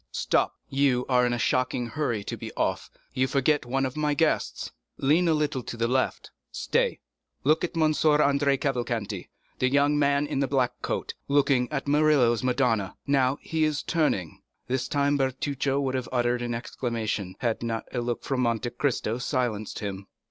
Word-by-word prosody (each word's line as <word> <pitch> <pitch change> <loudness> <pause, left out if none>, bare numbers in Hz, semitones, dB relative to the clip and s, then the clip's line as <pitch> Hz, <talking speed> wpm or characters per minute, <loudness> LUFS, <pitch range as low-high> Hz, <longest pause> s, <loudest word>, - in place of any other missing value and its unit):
"Stop! - - +1
You 135 -2 +2
are 125 -1 +4
in - - 0
a - - 0
shocking 125 0 0
hurry 120 -5 -2
to - - -4
be - - -7
off—you 130 0 -2
forget 140 0 +1
one 135 +2 0
of 130 - -4
my 150 -1 0
guests. - - 0 0.3
Lean 155 +6 +3
a 165 - +4
little 150 -4 0
to 120 - -7
the 115 0 +1
left. 130 +2 -1 0.2
Stay! - - 0 0.4
look 155 +3 +3
at 175 -1 -3
M. 160 - +3 0.2
Andrea 140 -2 +3
Cavalcanti, 120 -7 -2 0.3
the 130 - +3
young 145 +2 +3
man 140 0 +2
in 140 - -2
a 135 - +1
black 130 -3 +1
coat, - - -3
looking 140 -3 +2
at 140 -1 -3
Murillo's 145 -6 +4
'Madonna'; 125 -6 +1
now 135 -1 +2
he 160 -1 -1
is 155 -2 0
turning." 150 - 0 0.2
This 130 0 -1
time 145 +1 +1
Bertuccio 135 +1 -1
would 135 -2 -1
have 130 -1 -3
uttered 120 -1 +1
an 120 -1 -2
exclamation, 115 -5 -3
had 115 -3 -1
not 115 -1 -3
a 125 - -1
look 120 0 -3
from 135 -2 -1
Monte 120 0 0
Cristo 120 -2 -1
silenced 120 -5 -2
him. 100 -1 -5
130 Hz, 175 wpm, -26 LUFS, 120-140 Hz, 0.4 s, are